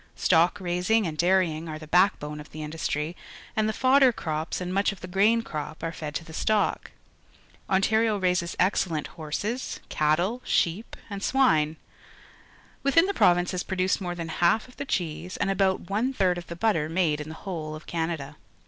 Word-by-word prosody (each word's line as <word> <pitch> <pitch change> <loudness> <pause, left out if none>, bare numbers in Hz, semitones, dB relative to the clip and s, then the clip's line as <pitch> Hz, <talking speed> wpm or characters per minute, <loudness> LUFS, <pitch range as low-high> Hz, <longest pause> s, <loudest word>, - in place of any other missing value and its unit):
_Stock 175 +3 +3
raising 185 +4 +1
and 160 -3 -3
dairying 170 -2 +1
are 155 - -5
the 155 - -10
backbone 155 -3 +2
of 150 - -10
the 155 - -8
industiy, 150 0 -3 0.4
and 215 0 +1
the - - +1
fodder 260 +2 +5
crops 160 -6 -3
and 180 0 -4
much 200 +2 +2
of 200 - -11
the 185 - -6
grain 210 +5 +3
crop 155 -1 -6
are 165 - -1
fed 155 -2 -6
to - - -2
the 160 - -11
stock. 215 +5 0 0.8
Ontario 220 +3 +2
raises 180 -2 0
excellent 180 -4 +1
horses, 200 - -4
cattle, 175 +11 +1
sheep, 180 +7 0
and 200 -2 -6
swine. 160 - +3 1.1
Within 330 +5 +4
the 400 - -1
province 175 - +3
is 180 - -1
produced 190 +1 0
more 175 -1 -3
than 165 -1 -5
half 175 +8 +2
of 250 - -18
the - - -4
cheese 175 - -3
and 195 - 0
about 190 -2 +1
one 225 +7 0
third 185 -6 +1
of 175 - -11
the 170 - -6
butter 170 -6 +1
made 165 -3 +1
in 150 - -7
the 160 - -7
whole 155 -5 -4
of 155 - -11
Canada. 160 -4 -3
180 Hz, 185 wpm, -26 LUFS, 160-200 Hz, 1.1 s, fodder